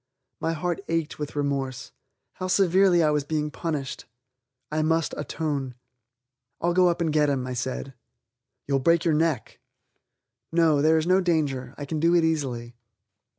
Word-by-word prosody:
My 165 - -1
heart 175 +4 -3
ached 165 -2 -2
with 150 -1 -5
remorse. 135 -3 -2 0.4
How 185 - -5
severely 185 -1 +4
I 155 - +3
was 150 -1 +1
being 150 0 -2
punished! 150 -4 -4 0.7
I 155 +1 0
must 160 0 +1
atone. 145 -4 -3 0.8
"I'll 175 +1 +1
go 180 0 +5
up 170 0 -1
and 160 -2 0
get 150 -1 +3
him," 135 -3 -1
I 130 - -4
said. 130 +2 -4 0.7
"You'll 140 -1 +1
break 165 +5 +3
your 165 - +3
neck." 150 -6 0 0.9
"No, 165 -3 +3
there 160 +2 +4
is 160 - 0
no 185 +2 +4
danger. 145 -8 -1
I 145 - -5
can 155 +2 -3
do 170 +2 +3
it 170 - +4
easily." 130 -7 -1
155 Hz, 160 wpm, -25 LUFS, 140-165 Hz, 0.9 s, go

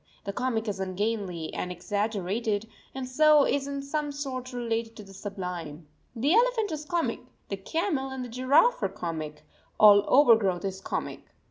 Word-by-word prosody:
The 200 - -4
comic 235 -1 -1
is 200 -2 -3
ungainly 190 -3 -2
and 180 - -3
exaggerated, 205 +3 -2 0.3
and 265 -1 -4
so 300 +2 +5
is 280 0 0
in 280 0 -4
some 295 +1 -2
sort 265 -3 -5
related 230 -2 -3
to 210 - -9
the 195 -1 -14
sublime. 180 -6 -6 0.3
The 275 +8 +2
elephant 460 -3 +3
is 305 -1 -4
comic, 340 +2 -1 0.3
the 195 - -3
camel 295 - -2
and 265 -1 -5
the - - -9
giraffe 275 - +3
are - - +1
comic, 155 -3 -6 0.3
all 205 -1 +8
overgrowth 220 -10 +4
is 190 0 -4
comic. - - -4
230 Hz, 160 wpm, -27 LUFS, 195-280 Hz, 0.3 s, all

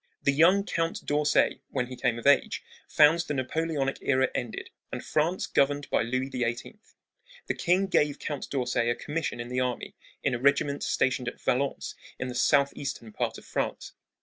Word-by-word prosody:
The 140 - +4
young 180 +7 +5
Count 165 -3 -2
d'Orsay, 150 0 +2
when 125 - -1
he 130 +1 -8
came 120 -2 0
of 120 - -8
age, 140 0 +3 0.2
found 155 +2 +5
the 150 -4 -2
Napoleonic 140 +1 -1
era 130 -1 +2
ended 120 -2 -4 0.2
and - - -5
France 165 +4 0
governed 145 +1 +1
by - - +3
Louis 130 +3 -2
XVIII. 120 - -3 0.7
The - - -1
king 185 +3 +2
gave 150 -6 +2
Count 145 -3 -5
d'Orsay 125 -3 0
a 120 - +1
commission 150 -5 -3
in 120 0 -5
the 125 0 -1
army 125 -1 -2 0.3
in 140 - +1
a 120 - -1
regiment 140 +1 +2
stationed 130 -1 0
at - - -5
Valence 135 +2 -1 0.2
in 130 - -4
the - - -5
southeastern 140 -2 +1
part - - -2
of - - -13
France. - - -3
140 Hz, 175 wpm, -28 LUFS, 125-150 Hz, 0.7 s, young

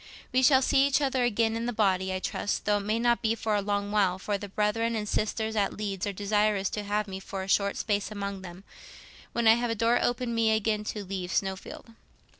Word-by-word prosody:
"We 255 - +4
shall 265 0 +5
see 275 +1 +4
each 280 - +2
other 265 -3 +1
again 225 -1 +1
in 230 +1 -2
the - - 0
body, 190 -4 +1
I 185 - -1
trust, 195 +2 -3
though, 210 0 +3
it 200 - -7
may 215 +1 +1
be, - - -2
not 240 0 +3 0.2
for 220 -1 -1
a 205 - +2
long 205 0 -2
while; 195 -4 +2
for 205 +2 -2
the 200 0 -6
brethren 215 +3 0
and 210 -1 -3
sisters 220 +1 -1
at 205 -2 0
Leeds 200 -2 -3
are - - -1
desirous 205 0 0
to 210 - -3
have 210 +1 -1
me 190 -1 -6
for 195 0 -6
a - - -7
short 200 +1 +1
space 205 -2 -1
among 200 -2 -5
them, 180 0 -10 0.7
when 235 -1 +1
I 220 - +9
have 240 +1 0
a 230 - 0
door 230 +2 +2
opened 245 0 -1
me 225 -1 +3
again 215 0 0
to 210 -1 -4
leave 185 -1 -4
Snowfield. 190 +4 -3
210 Hz, 235 wpm, -28 LUFS, 200-230 Hz, 0.7 s, I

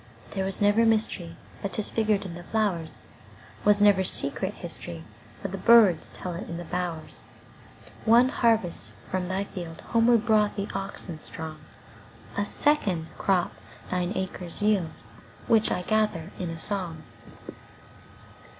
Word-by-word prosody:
There 195 - -1
was 195 - -2
never 205 +2 +5
mysteryBut 200 -4 -1
'tis 215 - -1
figured 215 -2 +1
in 180 - -6
the 175 - -8
flowers; 180 -4 -1 0.6
SWas 205 0 +5
never 200 -2 +6
secret - - -1
historyBut - - -8
birds 220 -8 +6
tell 180 - -6
it 170 - -6
in 170 - -4
the 175 - -5
bowers. 175 -2 -4 0.8
One 235 +3 +6
harvest 225 -9 +1 0.2
from 185 -1 -1
thy 190 +2 -1
fieldHomeward 225 +6 +1
brought 215 -2 +3
the 200 0 -2
oxen 190 -4 -5
strong;A 160 +5 -8
second 200 - +1
crop 185 -3 +2 0.4
thine 180 0 0
acres 185 0 -4
yield, 195 -7 +1 0.4
Which 220 -2 +3
I 180 - -1
gather 210 -5 0
in 180 - -2
a 165 -1 -6
song. 175 -5 -4
195 Hz, 125 wpm, -27 LUFS, 175-215 Hz, 0.8 s, never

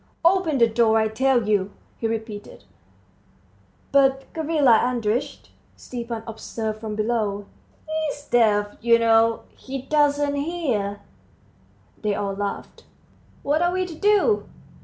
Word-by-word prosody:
"Open 340 -4 +3
the 235 - +6
door, 225 0 +3
I 220 0 +2
tell 245 0 +1
you," 200 -2 +1 0.3
he 225 - -1
repeated. 220 - -6 1.3
"But, 270 -1 +3
Gavrila 300 -8 +3
Andreitch," 245 +1 -2 0.2
Stepan 235 -2 -6
observed 220 -1 -5
from 215 -1 -5
below, 215 -2 -1 0.4
"he's 310 -2 -3
deaf, 210 -5 +2
you 235 0 +5
know 230 0 +3
he 270 -1 -7
doesn't 290 0 +1
hear." 275 -11 -2 1.0
They 210 -2 0
all 200 -1 -2
laughed. 200 0 -5 0.6
"What 295 +3 +1
are 350 0 +2
we 370 0 -1
to 355 - -8
do?" 415 +4 +2
235 Hz, 120 wpm, -23 LUFS, 215-290 Hz, 1.3 s, the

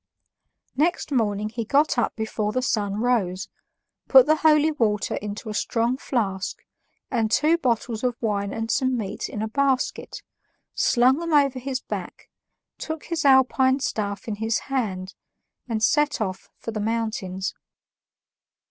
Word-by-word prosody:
Next 305 +2 0
morning 215 -5 0
he 230 +1 -4
got 285 +7 +2
up 235 - 0
before 220 -1 -2
the 255 +3 -1
sun 205 -6 0
rose, 205 -6 0 0.6
put 265 -2 +8
the 310 +1 +3
holy 310 0 +4
water 215 -8 0
into 210 +2 -6
a 215 - -4
strong 230 +3 0
flask, 200 -8 -3 0.5
and 225 -4 +1
two 305 +8 +3
bottles 235 -4 -1
of 250 -2 +1
wine 200 -3 -1
and 225 +1 -3
some 260 -2 +1
meat 205 -4 -4
in 210 - -4
a - - -1
basket, 270 +2 -1 0.5
slung 255 +4 +3
them 335 -1 -3
over 280 -3 +3
his 260 0 -3
back, - - -7 0.5
took 315 -1 -5
his 330 -3 -3
alpine 265 0 +4
staff 205 -6 -3
in 210 -2 -3
his 225 +1 0 0.2
hand, 190 -7 -2 0.6
and 220 -1 -1
set 295 +4 +2
off 190 -3 -4
for 230 - -6
the 215 - -4
mountains. 215 -4 -2
230 Hz, 150 wpm, -24 LUFS, 210-270 Hz, 0.6 s, put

